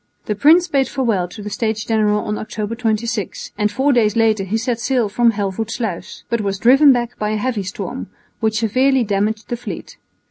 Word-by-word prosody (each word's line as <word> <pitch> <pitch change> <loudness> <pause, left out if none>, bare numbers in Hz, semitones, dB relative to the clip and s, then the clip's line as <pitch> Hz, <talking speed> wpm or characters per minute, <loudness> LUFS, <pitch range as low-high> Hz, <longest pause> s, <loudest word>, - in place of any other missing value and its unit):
The 210 - -1
prince 320 - +5
bade 275 -4 +1
farewell 225 -9 0
to 205 +4 -10
the 210 - -6
States 220 0 -2
General 210 -2 +1
on 210 0 -2
October 215 0 -4
26, 225 -3 -2
and 210 0 0
four 270 +5 +2
days 220 -3 +2
later 220 -3 +2
he 195 +4 -1
set 235 0 -2
sail 245 -2 +1
from 230 +3 +3
Helvoetsluis, 210 0 -4
but 235 -1 -1
was 195 -1 -2
driven 270 +7 +6
back 245 -1 -1
by 210 - -1
a 215 - 0
heavy 230 -1 -1
storm, 190 +1 -6 0.3
which 220 -1 0
severely 255 +4 +2
damaged 210 +1 -1
the 240 - -2
fleet. 235 - -8
220 Hz, 190 wpm, -19 LUFS, 210-245 Hz, 0.3 s, driven